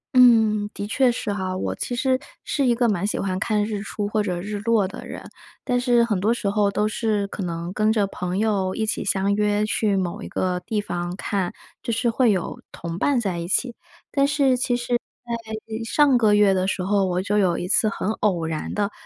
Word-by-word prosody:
嗯， 220 -4 +5
的 200 - -4
确 250 +4 +3
是 215 -3 -3
哈， 185 -2 -3
我 95 -1 -2
其 245 - -4
实 260 +1 +1 0.2
是 280 -3 0
一 240 - +3
个 240 0 +2
蛮 200 -4 0
喜 - - -2
欢 185 -1 -2
看 210 -1 +1
日 210 -2 -3
出 205 +1 -3
或 215 +1 0
者 180 -4 -2
日 205 +2 -4
落 215 -2 +2
的 195 - -9
人。 - - -7 0.4
但 245 0 +1
是 245 -2 +4
很 215 -5 0
多 210 +4 +2
时 235 -4 0
候 205 -1 +2
都 210 +1 0
是 215 -2 0
可 200 - -6
能 170 0 -4
跟 215 +1 +2
着 215 -2 +2
朋 180 -1 -4
友 200 -3 0
一 220 - 0
起 215 - -2
相 195 +1 +1
约 210 0 +1
去 215 -1 +1
某 185 -3 -2
一 - - -6
个 180 - -1
地 215 - 0
方 175 -3 -3
看， 190 -3 -1 0.3
就 - - -3
是 230 +1 +1
会 245 +1 +3
有 185 -4 -2
同 170 +2 -6
伴 280 -3 +2
在 190 -6 -2
一 170 - -4
起， 240 +6 0 0.4
但 275 -1 +3
是 280 -3 +3
其 245 -1 0
实 240 0 -3 0.3
在， 240 - -4 0.5
呃， - - -4
上 280 +4 +3
个 215 -4 +4
月 205 -2 +5
的 185 0 0
时 190 -1 -1
候， 195 0 +2
我 180 0 0
就 205 +1 +1
有 180 -4 +2
一 175 - -3
次 215 +3 +3
很 205 0 -2
偶 180 -6 +1
然 160 -1 -3
地 205 0 0
210 Hz, 245 characters per minute, -23 LUFS, 190-230 Hz, 0.5 s, 嗯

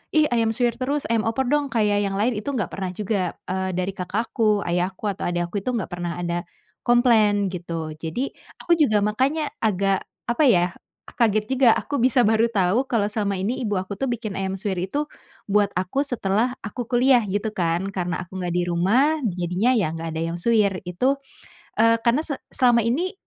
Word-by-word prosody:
"Ih 310 - +5
ayam 225 -1 +2
suwir 240 -2 +1
terus, 280 +3 -1
ayam 225 -1 +1
opor 255 +4 0
dong 295 -1 +2
kayak 210 -4 +2
yang 195 - -3
lain." 230 +4 +1
Itu 280 +5 -4
nggak 210 -7 -2
pernah 190 -1 -4
juga, 195 -3 -1
eee, 190 0 -2
dari 185 +1 -1
kakakku, 210 +2 0
ayahku, 180 +4 -2
atau 190 - -4
adik 175 0 -2
aku 205 - -1
itu - - -2
nggak 215 -7 -3
pernah 175 -1 -3
ada 175 0 -3 0.4
komplain 215 -5 +4
gitu. 165 -3 -5
Jadi 165 - -3 0.3
aku 345 - +3
juga 215 -8 +4
makanya 270 +8 0
agak 195 -2 +1 0.2
apa 240 +6 +1
ya 180 -8 +5 0.4
kaget 215 -3 +1
juga, 260 -2 +5
aku 285 - -2
bisa 250 0 +4
baru 225 +1 +3
tau 220 +4 +1
kalau 210 -3 0
selama 205 -2 -1
ini 210 +8 -2
ibu 210 -5 -1
aku 190 +2 -4
tuh 270 - 0
bikin 220 -5 -3
ayam 190 0 -2
suwir 190 -2 -2
itu 290 +9 -1 0.5
buat 205 0 +4
aku 185 +9 -1
setelah 240 -2 0
aku 235 +2 -5
kuliah 250 0 +4
gitu 205 +3 -2
kan. 175 0 -1
Karena 180 -1 -3
aku 185 +1 -9
nggak 175 -1 -2
di 180 - +2
rumah 235 - +2
jadinya 180 +7 0
ya 190 -8 +1
nggak 165 0 -5
ada - - -2
ayam 165 +1 -3
suwir 205 -3 +2
itu, 255 +11 +1 0.6
eee, 230 +1 +5
karna 245 +6 +2
se 285 - -3 0.2
selama 240 -2 +3
ini, 310 - 0
210 Hz, 190 wpm, -23 LUFS, 185-240 Hz, 0.6 s, Ih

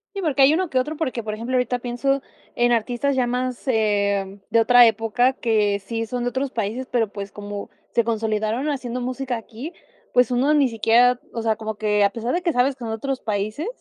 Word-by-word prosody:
Sí, 395 - -3
porque 285 -4 +1
hay 270 +3 +7
uno 360 +1 0
que 260 - +2
otro, 300 +4 -3
porque, 260 -7 -2
por 215 -1 -4
ejemplo, 235 +4 -3
ahorita 250 0 +1
pienso 255 +3 -1 0.3
en 240 0 +3
artistas 240 +4 0
ya 255 -2 +1
más, 250 +1 -3
eh, 200 -4 +1
de 230 - +4
otra 245 +1 +7
época 225 +4 +2
que 215 -5 +1
sí 225 +2 -4
son 245 +1 -3
de 245 - 0
otros 265 +2 -2
países 230 +3 -3
pero 230 -3 +1
pues 200 -1 -7
como 205 0 -7 0.2
se 235 - +2
consolidaron 220 +3 -1
haciendo 255 -3 -3
música 255 0 -3
aquí 230 +7 -8 0.4
pues 250 -1 +4
uno 260 +5 +3
ni 285 -3 +4
siquiera 240 +2 +3
o 230 - -4
sea, 220 -1 +2
como 220 0 -5
que 210 -1 +1
a 200 - +4
pesar 235 +3 -3
de 355 - 0
que 345 - +1
sabes 255 +2 +2
que 255 - -11
en - - -4
otros 255 +4 -3
países 215 - -2
240 Hz, 215 wpm, -22 LUFS, 220-255 Hz, 0.4 s, hay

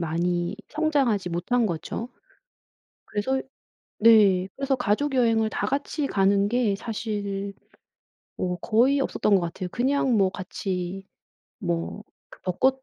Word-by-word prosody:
많이 175 +3 -1
성장하지 275 - +1
못한 225 +8 +1
거죠. 195 +6 -4 1.0
그래서 265 +6 0 0.6
네 205 -5 +6
그래서 275 0 0
가족 255 +4 0
여행을 225 -3 +3
다 - - -2
같이 285 +2 -1
가는 200 -1 +3
게 235 -4 +1
사실 200 -2 -4 0.8
뭐 180 -1 -2
거의 240 +9 +3
없었던 210 -6 +2
것 190 - +3
같아요. 175 +2 -4
그냥 265 0 +1
뭐 195 -1 +4
같이 185 0 -4 0.5
뭐 175 +1 -3 0.3
그 - - -15
벚꽃 265 +9 +1
210 Hz, 230 characters per minute, -25 LUFS, 185-245 Hz, 1.0 s, 네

